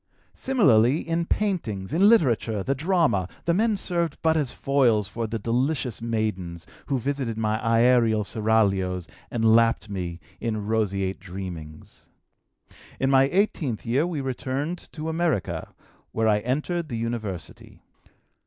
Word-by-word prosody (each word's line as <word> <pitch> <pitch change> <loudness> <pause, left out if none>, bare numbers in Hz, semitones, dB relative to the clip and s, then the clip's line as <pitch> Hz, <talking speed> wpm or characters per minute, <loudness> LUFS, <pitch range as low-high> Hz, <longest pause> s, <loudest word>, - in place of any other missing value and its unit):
Similarly 145 - +3
in 165 0 0
paintings, 155 - -2
in 195 +6 +5
literature, 115 - +2
the 135 - 0
drama, 145 - +1 0.2
the 170 - +2
men 215 +3 +2
served 170 -5 -1
but 160 0 +3
as 145 -5 0
foils 120 -7 +2
for 115 +4 -4
the 115 +1 -3
delicious 125 +3 -1
maidens, 105 -8 -3 0.2
who 140 - 0
visited 130 -3 -2
my 110 -1 0
aërial 115 -2 +3
seraglios 100 -5 +1 0.2
and 115 -1 +3
lapped 115 -2 +2
me 90 -3 -4 0.2
in 110 -3 -3
roseate 100 -3 -1
dreamings. 90 -5 -9 0.9
"In 135 0 +1
my 135 0 +6
eighteenth 170 - 0
year 135 +8 +1
we 160 -5 -3
returned 135 +5 -4
to 155 -1 -5
America, 160 - -1 0.4
where 110 0 +1
I 105 -1 +3
entered 150 +8 -2
the 120 - -3
university. 115 -6 -6
115 Hz, 135 wpm, -25 LUFS, 105-150 Hz, 0.9 s, my